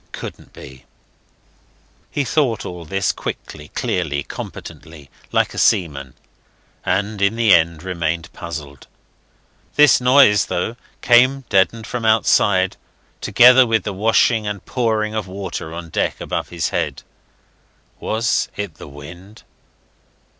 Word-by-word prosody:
Couldn't - - -9
be. 65 -1 -13 1.2
He 145 - -1
thought 130 -5 0
all 90 -2 -7
this 95 +3 0
quickly, 75 -1 -7
clearly, 75 -5 -2
competently, 75 -4 -10 0.2
like - - +1
a - - -4
seaman, 70 -8 +1 0.7
and 105 +1 -1
in 100 +2 +2
the 115 -3 +4
end 85 -1 +2
remained 85 -3 -3
puzzled. 75 -5 -8 0.9
This 150 -3 +6
noise, 125 -5 +5
though, 100 +6 -2 0.3
came 130 +3 +4
deadened 105 +3 +2
from 120 +1 -5
outside, 100 -4 +2 0.4
together 125 +1 +6
with 115 -1 +1
the 105 - -4
washing 110 +2 +2
and 100 -2 -5
pouring 110 -3 -1
of 110 -3 -3
water 95 -4 -6
on 85 0 -8
deck - - -1
above - - -4
his 85 -2 -2
head. - - -3 1.0
Was 115 +1 0
it 100 -6 -5
the - - -11
wind? 85 +9 -12
100 Hz, 125 wpm, -19 LUFS, 85-115 Hz, 1.2 s, This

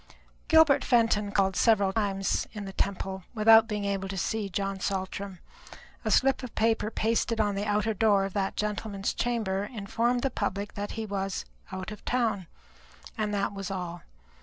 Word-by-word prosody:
Gilbert 320 -4 +6
Fenton 225 -4 +2
called 195 -2 +2
several 200 -4 +3
times 195 -2 0
in 210 -2 -6
the 195 - -7
Temple 190 -1 -2
without 225 +1 +7
being 210 -3 -2
able 195 -1 -2
to 195 - -4
see 210 +2 -1
John 195 +1 -2
Saltram; 195 0 -3 0.7
a - - -1
slip 270 0 +3
of 255 -4 -8
paper 225 -1 +2
pasted 225 +1 0
on 205 -2 +2
the 200 +1 -2
outer 210 +1 +1
door 205 -2 +3
of 195 - -5
that 195 -1 -1
gentleman's 210 -1 -2
chamber 205 -5 -1
informed 235 +3 0
the 270 - +1
public 200 -2 -3
that 205 0 -4
he 225 0 -4
was 195 -2 -3 0.3
"out 190 +2 -5
of 210 - -9
town," 220 -7 0 0.7
and 215 -3 -1
that 200 0 -1
was 195 -2 -5
all. 175 -3 -5
205 Hz, 170 wpm, -28 LUFS, 195-225 Hz, 0.7 s, without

